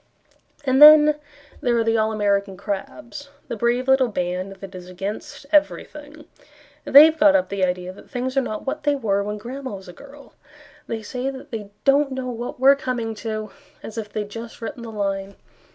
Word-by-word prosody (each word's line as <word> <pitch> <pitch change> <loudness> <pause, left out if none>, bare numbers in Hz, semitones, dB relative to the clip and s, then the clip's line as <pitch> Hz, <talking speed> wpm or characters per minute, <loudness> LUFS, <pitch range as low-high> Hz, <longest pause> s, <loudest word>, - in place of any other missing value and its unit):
And 265 0 +2
then 300 0 +9 0.5
there 245 -4 +1
are 230 - +2
the 225 0 +1
All 220 0 +1
American 200 -2 0
Crabs; 235 +9 -6 0.2
The - - -3
Brave 240 +3 0
Little 265 -1 +4
Band 185 -2 -3
that 195 0 -11
is 180 -1 -10
Against 195 +8 -6
Everything. 300 0 -1 0.6
They 285 +3 +9
have 320 0 +1
got 300 -1 +6
up 280 - +1
the 200 -1 -2
idea 180 0 -1
That - - -16
things 255 +1 -3
are 270 - +3
not 215 -4 -5
what 280 +3 -3
they 290 -1 +1
were 205 -7 0
when 210 +1 -4
Grandma 255 +2 -7
was 190 0 -11
a 180 - -10
girl. 280 +4 -15 0.5
They 225 -1 -4
say 250 +4 -3
that 265 -1 -10
they 215 -3 -6
don't 275 0 +3
know 260 -1 -4
what 240 +1 -6
we're 270 +2 +6
coming 245 -4 -3
to, 215 -2 -4 0.3
As 220 - -8
if 215 -2 -6
they 215 - -2
had 205 0 -8
just 230 +1 -8
written 235 +1 -6
the 235 - -7
line. 195 -2 -3
230 Hz, 200 wpm, -22 LUFS, 205-275 Hz, 0.6 s, then